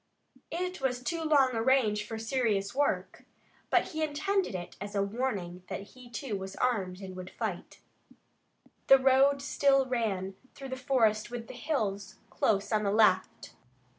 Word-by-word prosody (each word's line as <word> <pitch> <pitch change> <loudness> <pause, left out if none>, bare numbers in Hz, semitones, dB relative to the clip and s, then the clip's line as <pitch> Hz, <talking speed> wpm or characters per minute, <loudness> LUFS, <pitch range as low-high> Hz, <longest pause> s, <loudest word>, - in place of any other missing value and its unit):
It 360 -1 -3
was 250 -2 -1
too 335 +1 -2
long 290 -5 +4
a 225 - 0
range 220 -5 +2
for 225 - -5
serious 220 -4 0
work, 285 +2 -1 0.5
but - - +2
he 315 -1 -4
intended 315 - 0
it 175 -1 -6
as 205 0 -6
a 200 - +2
warning 200 -5 -3
that 195 +3 -6
he, 250 -1 -14
too, 240 -2 -4
was 190 0 -6
armed 195 -7 -1
and 190 -1 -8
would 185 0 -7
fight. - - -5 1.1
The 270 - +9
road 270 +1 +4
still 275 -1 +3
ran 210 -7 -1 0.2
through 270 -1 -8
the 260 - -3
forest 235 -5 +1
with 235 -1 -6
the - - -9
hills 215 -8 -2 0.2
close 200 -1 +1
on 215 -1 +2
the 205 - 0
left. 200 -3 +2
235 Hz, 165 wpm, -30 LUFS, 200-270 Hz, 1.1 s, The